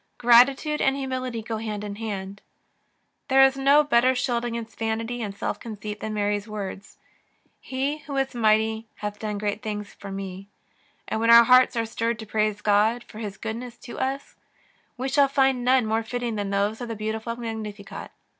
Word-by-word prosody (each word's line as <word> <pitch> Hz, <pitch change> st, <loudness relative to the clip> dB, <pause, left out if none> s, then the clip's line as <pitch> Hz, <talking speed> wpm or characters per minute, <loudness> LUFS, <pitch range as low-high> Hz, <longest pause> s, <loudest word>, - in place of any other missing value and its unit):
Gratitude 265 Hz, +5 st, +5 dB
and 270 Hz, 0 st, +3 dB
humility 255 Hz, -4 st, -3 dB
go 225 Hz, 0 st, -3 dB
hand 215 Hz, -2 st, -4 dB
in 205 Hz, -1 st, -6 dB
hand. 200 Hz, -3 st, -5 dB, 0.9 s
There 270 Hz, 0 st, +6 dB
is 270 Hz, 0 st, +5 dB
no 280 Hz, +2 st, +5 dB
better 255 Hz, -2 st, +3 dB
shield 245 Hz, -1 st, 0 dB
against 235 Hz, -1 st, -5 dB
vanity 225 Hz, +2 st, -2 dB
and 200 Hz, -2 st, -5 dB
self 205 Hz, -, -3 dB
conceit 210 Hz, -2 st, -7 dB
than 215 Hz, 0 st, -4 dB
Mary's 205 Hz, 0 st, -1 dB
words: 200 Hz, -2 st, -7 dB, 0.3 s
" -, -, -41 dB
He 275 Hz, +3 st, -2 dB
who 285 Hz, -2 st, -6 dB
is 270 Hz, 0 st, 0 dB
mighty 220 Hz, -1 st, +2 dB
hath 210 Hz, 0 st, -5 dB
done 210 Hz, -1 st, -3 dB
great 205 Hz, +1 st, -2 dB
things 210 Hz, -2 st, -5 dB
for 200 Hz, -, -9 dB
me; 195 Hz, 0 st, -6 dB, 0.3 s
'' -, -, -38 dB
and -, -, -2 dB
when 230 Hz, +1 st, +1 dB
our 235 Hz, 0 st, +10 dB
hearts 255 Hz, +1 st, +5 dB
are 230 Hz, -1 st, 0 dB
stirred 230 Hz, 0 st, -2 dB
to 220 Hz, -, -8 dB
praise 215 Hz, -1 st, 0 dB
God 215 Hz, +3 st, +2 dB
for 215 Hz, -, -12 dB
His 205 Hz, -3 st, -5 dB
goodness 235 Hz, +2 st, -6 dB
to 240 Hz, -, -9 dB
us, 270 Hz, +1 st, -3 dB, 0.6 s
we 260 Hz, +2 st, -2 dB
shall 280 Hz, +1 st, +4 dB
find 270 Hz, -2 st, +2 dB
none 255 Hz, -1 st, +4 dB
more 220 Hz, +1 st, +1 dB
fitting 240 Hz, +1 st, -3 dB
than 205 Hz, -2 st, -3 dB
those 200 Hz, +3 st, 0 dB
of 240 Hz, -, -5 dB
her 225 Hz, -, -3 dB
beautiful 220 Hz, +2 st, -3 dB
Mag 230 Hz, -2 st, -5 dB
nificat. 210 Hz, -2 st, -8 dB
225 Hz, 190 wpm, -25 LUFS, 210-250 Hz, 0.9 s, our